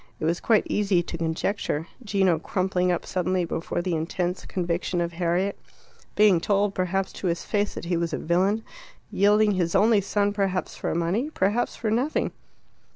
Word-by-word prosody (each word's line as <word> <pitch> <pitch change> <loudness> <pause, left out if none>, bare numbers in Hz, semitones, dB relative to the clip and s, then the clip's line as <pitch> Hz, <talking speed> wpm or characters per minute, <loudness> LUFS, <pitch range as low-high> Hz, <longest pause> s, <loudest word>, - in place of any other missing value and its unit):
It - - -2
was 170 +2 +1
quite 220 -3 +3
easy 195 -4 +1
to 170 - -6
conjecture: 160 -1 -1 0.2
Gino 190 -6 +2
crumpling 180 +1 0
up 175 - -2
suddenly 185 0 0
before 165 +1 -3
the 180 -1 -1
intense 175 +3 -2
conviction 175 0 -1
of 170 0 -1
Harriet; 175 +3 0 0.6
being 205 -5 +5
told, 200 +1 +1
perhaps, 190 +1 -1
to 190 - -4
his 170 0 -1
face 205 -1 -1
that - - -6
he 175 0 0
was 170 -1 -1
a - - -1
villain; 190 +6 +1 0.5
yielding 210 +1 +4
his 175 -4 0
only 210 +1 +5
son 205 +1 0
perhaps 195 -3 -1
for - - -3
money, 180 - 0
perhaps 215 -3 0
for 220 -2 -2
nothing. 255 +7 0
185 Hz, 170 wpm, -25 LUFS, 170-205 Hz, 0.6 s, being